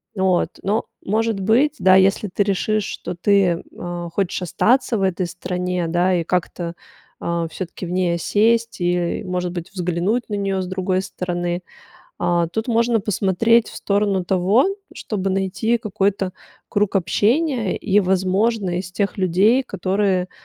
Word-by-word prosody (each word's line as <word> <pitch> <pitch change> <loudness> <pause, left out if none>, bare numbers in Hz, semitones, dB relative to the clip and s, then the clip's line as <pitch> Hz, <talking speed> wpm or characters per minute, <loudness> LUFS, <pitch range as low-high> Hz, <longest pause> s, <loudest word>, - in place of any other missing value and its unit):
вот. 190 -2 +2
Но 210 +4 0 0.2
может 220 +1 0
быть, 235 +10 +3
да, 185 0 +6
если 195 +2 +3
ты 205 - +2
решишь, 205 +1 0
что - - -5
ты, 180 -1 +2 0.2
а, 175 -1 -5
хочешь 190 +1 -1
остаться 230 - +2
в - - -2
этой 185 -1 0
стране, 180 0 -3
да, 175 +2 +2
и - - -1
как-то, 175 0 -2 0.5
а 170 -1 -2
всё-таки 185 +1 -6
в 175 - -6
ней 180 -1 +1
осесть 225 +5 +1
и, 175 0 0
может 180 -1 -2
быть, 175 -1 -6
взглянуть 180 +5 -1
на - - -4
неё 195 -1 -1
с - - -3
другой 185 0 -1
стороны. 175 -2 -3 0.6
А, 170 -1 +1
тут 220 +8 -3
можно 230 -1 +2
посмотреть 210 +3 +2
в - - -11
сторону 200 -2 0
того, 190 - +3 0.3
чтобы 195 -3 -3
найти 195 +5 0
какой-то 195 -3 -1 0.4
круг 205 -1 0
общения 230 - +1
и, 205 0 +2
возможно, 190 0 +1
из 185 - -6
тех 200 +1 -2
людей, 195 +8 +3
которые 190 -5 0
190 Hz, 150 wpm, -21 LUFS, 180-210 Hz, 0.6 s, да